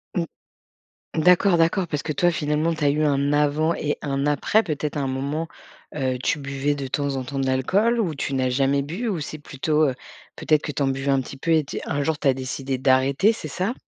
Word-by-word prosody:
Mmh. 170 - +1 0.9
D'accord, 180 +3 +4
d'accord. 170 +2 +2
Parce 150 -2 -3
que 155 - -2
toi, 175 +5 +3
finalement, 155 +1 0
tu 155 -2 -4
as - - +5
eu 150 +2 +1
un 140 0 +2
avant 150 +2 +2
et 150 -1 -2
un 140 -1 -1
après, 150 +9 +2
peut-être, 150 -4 -3
à - - 0
un 135 - -1
moment, 140 +5 -2 0.5
heu, 130 -3 -1
tu 155 - +1
buvais 140 +1 -1
de 140 -2 -4
temps 140 +1 -1
en 130 - -3
temps 135 +2 -5
de 135 - 0
l'alcool? 195 - +2
Ou 170 -9 0
tu 140 - -3
n'as 130 -1 +1
jamais 135 +2 +2
bu? 175 - -4
Ou 185 - -2
c'est 155 +1 -6
plutôt, 150 +2 0
heu, 130 - -4 0.4
peut-être, 155 -1 +2
que 150 - -4
tu 145 - -4
en 135 - +2
buvais 135 +1 0
un 135 -1 +2
petit 135 - -9
peu 165 +5 -2
et 160 -1 +4
t - - -5
un 145 0 -1
jour 160 +1 0
tu 145 - 0
as 135 - +5
décidé 135 0 -4
d'arrêter, 135 - +3
c'est 160 - -7
ça? 185 - -2
145 Hz, 240 wpm, -23 LUFS, 135-160 Hz, 0.9 s, as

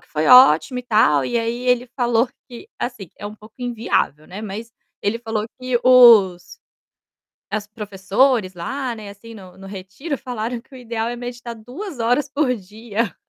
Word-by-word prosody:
que - - -26
foi 155 +1 -1
ótimo 250 - +7
e - - -5
tal, 210 - +3
e 235 - 0
aí 235 +2 -3
ele 250 0 +2
falou 240 -1 +2 0.2
que, 245 +9 -11
assim, 215 -8 -5
é 205 - -6
um 210 - -8
pouco 215 +1 -17
inviável, 230 - -1
né, 190 +3 -8
mas 220 +2 -7 0.3
ele 205 +3 0
falou 225 -2 -3
que 255 -1 0
os 230 -8 +6 0.9
as 210 0 -3
professores 210 +1 0
lá, 250 +8 -4
né, 215 -2 -9
assim, 225 +3 -13
no 185 -4 -13
no 195 - -11
retiro 195 - -6
falaram 240 -1 -4
que 265 - -19
o 260 - -10
ideal 230 -2 -3
é 240 - -4
meditar 240 -1 -7
2 260 - -8
horas 245 +5 +1
por 275 -2 +1
dia. 215 0 -4
230 Hz, 175 wpm, -21 LUFS, 205-250 Hz, 0.9 s, ótimo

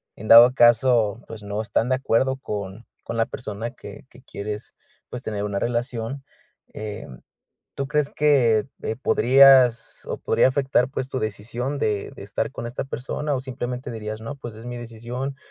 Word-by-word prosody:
en 110 - -9
dado 120 +2 +9
caso, 120 -3 +4
pues, 110 -2 -9
no 105 +1 -3
están 110 +2 -1
de 130 - +3
acuerdo 130 +1 +1
con 105 -3 -6 0.2
con 115 - -5
la 115 - +2
persona 115 -2 -6
que - - -11
que 125 - -17
quieres, 105 -2 -7 0.4
pues, 125 - -6
tener 105 -2 -3
una 100 -1 -2
relación, 120 +3 -3 0.5
eh, 105 -1 -6 0.7
¿tú 140 - -3
crees 150 0 0
que 125 -8 +3 0.4
podrías 130 -3 +5
o - - -4
podría - - +3
afectar, 130 -1 +1
pues, 130 -2 -4
tu 130 - -2
decisión 120 +6 -3
de 105 -7 -1
de - - -9
estar 100 +8 -3
con 120 - -6
esta 120 +3 -4
persona? 140 +3 -3
O 130 - -1
simplemente 125 -1 -5
dirías: 110 -1 -6
"No, 140 +5 -6
pues, 120 -5 -8
es 110 - -11
mi 120 0 -5
decisión", 120 +4 -6
120 Hz, 170 wpm, -23 LUFS, 110-130 Hz, 0.7 s, dado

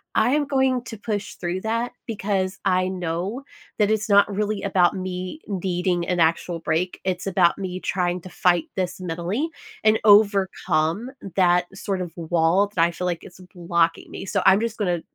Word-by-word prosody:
I 245 - +3
am 295 +1 +2
going 265 -2 +1
to 225 - -7
push 205 -1 -4
through 180 +1 -3
that, 230 +3 -2
because 195 -3 -2
I 185 -1 +2
know 180 +7 -3 0.3
that 210 -1 +3
it's 215 0 0
not 200 0 +5
really 210 0 -1
about 185 -2 +3
me 185 - -5
needing 180 -2 -1
an 180 -1 0
actual 165 +1 +1
break, 165 +3 -1
it's 185 -1 -2
about 180 -2 +3
me 185 -2 -4
trying 180 -1 -1
to 185 - -10
fight 175 -2 +2
this 185 -1 -2
mentally, 180 - -2 0.4
and 215 0 +5
overcome 200 -2 +3 0.3
that, 180 -2 +4
sort 195 -1 -3
of, 175 -2 -5
wall 165 -1 +1 0.3
that 165 - +4
I 170 - +2
feel 180 - -5
like 175 -2 -2
is 180 - -13 0.2
blocking 170 -1 0
me, - - -7
so, - - 0
I'm 190 +1 +6
just 230 0 -3
gonna 180 -5 0
185 Hz, 180 wpm, -23 LUFS, 175-210 Hz, 0.4 s, I'm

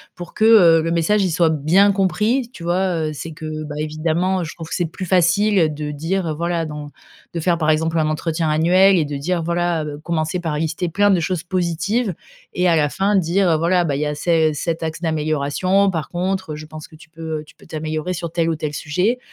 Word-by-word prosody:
pour 175 -1 -9
que, 215 - +1
heu, 175 -8 +7
le 165 +1 -2
message, 185 +5 +2
il 180 - -1
soit 165 0 +3
bien 160 +7 +3
compris, 215 +6 0
tu 170 - -10
vois? 175 -2 0
Heu, - - -4
c'est 160 +2 -7
que, 155 -1 -6
bah, 145 -1 -7
évidemment, 160 +5 -1
heu, - - -2
je 160 - -7
trouve 165 -1 -9
que - - -5
c'est 175 - 0
plus 170 +3 -6
facile 180 -1 +3
de 150 0 -5
dire: 165 +3 -2
«Voilà 170 0 -1
dans» 150 -1 -7 0.4
de 170 - -2
faire, 170 +1 +1
par 155 -1 0
exemple, 160 +1 +1
un 155 - +1
entretien 160 +1 -1
annuel 180 +5 +4
et 165 - +2
de 145 -1 -4
dire: 170 +4 -1
«Voilà, 170 -1 0
heu», 150 -1 -6
commencer 165 +1 -1
par 160 -4 -3
lister 160 +3 -2
plein 205 +5 +2
de 185 - +3
choses 170 0 -2
positives. 180 +4 -1 0.4
Et 180 0 +2
à 165 - +3
la 150 -1 +3
fin 195 +6 +1
dire: 185 +1 +2
«Heu, 160 - +3
voilà, 175 +3 +2
bah 145 -5 -1
il - - -3
y 150 - 0
a 150 0 -2
ces 160 0 +2
cet 165 +2 -3
axe 160 0 -4
d'amélioration. 160 +5 +1
Par 160 -5 -3
contre, 185 -2 -3
je 155 +1 -8
pense 155 0 -10
que - - -17
tu 160 +1 -17
peux, 160 -1 -5
heu, - - -8
tu - - -19
peux - - -19
t'améliorer 155 +2 -4
sur 170 -2 -5
tel 165 -1 0
ou 165 - 0
tel 150 -1 -4
sujet». 180 +12 -1
165 Hz, 240 wpm, -20 LUFS, 155-180 Hz, 0.4 s, heu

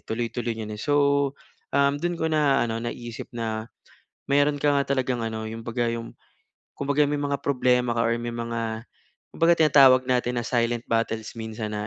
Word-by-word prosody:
tuloy-tuloy 115 0 -3
niyan, 105 -1 -5
eh. 105 - -8
So 145 - +1 0.7
um, 140 0 +3
doon 175 -1 -1
ko 160 - 0
na 150 -5 +2
ano 115 0 -3
naisip 120 -1 -6
na 110 -1 -4 0.5
mayroon 145 +1 +2
ka 145 +1 +1
nga 140 -1 +1
talagang 130 -2 -1
ano 110 -1 -3
yung 110 +1 -6
kumbaga 120 0 -1
yung 115 0 -6 0.6
kumbaga 145 +1 +2
may 145 0 -1
mga 140 -1 -2
problema 125 -3 +2
ka 115 - +2
or 115 - +2
may 120 0 -4
mga 115 -1 -4 0.5
kumbaga 165 +1 +3
tinatawag 140 -5 +6
natin 125 -1 +1
na - - -4
silent 120 -1 0
battles 115 -1 -1
minsan 110 -1 -5
na 105 0 -3
120 Hz, 175 wpm, -25 LUFS, 115-140 Hz, 0.7 s, tinatawag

